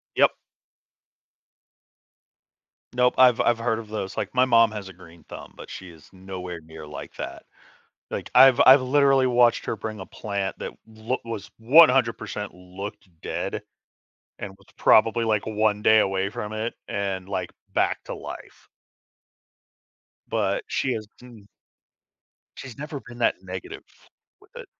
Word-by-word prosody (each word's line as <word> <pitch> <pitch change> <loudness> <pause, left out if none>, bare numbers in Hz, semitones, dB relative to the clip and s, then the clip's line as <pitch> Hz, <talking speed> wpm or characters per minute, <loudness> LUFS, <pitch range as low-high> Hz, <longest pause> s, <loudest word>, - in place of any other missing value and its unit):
Yup. - - +4 2.6
Nope, 125 0 +2
I've 125 -2 +6
I've 120 - +2
heard 115 -1 0
of 110 -2 -10
those, 95 -3 -5
like, - - -3
my 130 0 +4
mom 115 -3 +5
has 105 -3 -7
a - - -11
green 85 -2 -16
thumb, - - -11
but - - -11
she 95 - -9
is 80 -3 -17
nowhere 90 -2 -7
near 80 0 -11
like 75 - -9
that. - - -6 0.7
Like, - - -5
I've 130 +1 +7
I've 130 +2 +9
literally 135 0 +3
watched 120 -1 +3
her - - -2
bring 110 0 -6
a 95 - -7
plant 100 -2 -4
that - - -5
loo 110 +3 -4
was 115 -3 -6
100% 115 -5 +4
looked 90 +2 -9
dead, - - -4 0.8
and 100 - -6
was 100 - -23
probably 115 +1 +4
like 110 -2 0
one 105 -1 0
day 110 +1 +6
away 95 -1 0
from 105 0 -6
it, 110 +2 -3
and 95 -2 -3
like 90 -3 -3 0.2
back - - 0
to - - -6
life. - - -10 1.6
But 100 -3 0
she 130 - -1
has 110 -2 -5
hmm 120 -3 -14 1.2
She's 130 -4 -9
never 150 0 -6
been 120 0 -13
that 120 - +3
negative 95 -1 -8 0.6
with - - -23
it. - - -9
110 Hz, 150 wpm, -24 LUFS, 95-120 Hz, 2.6 s, I've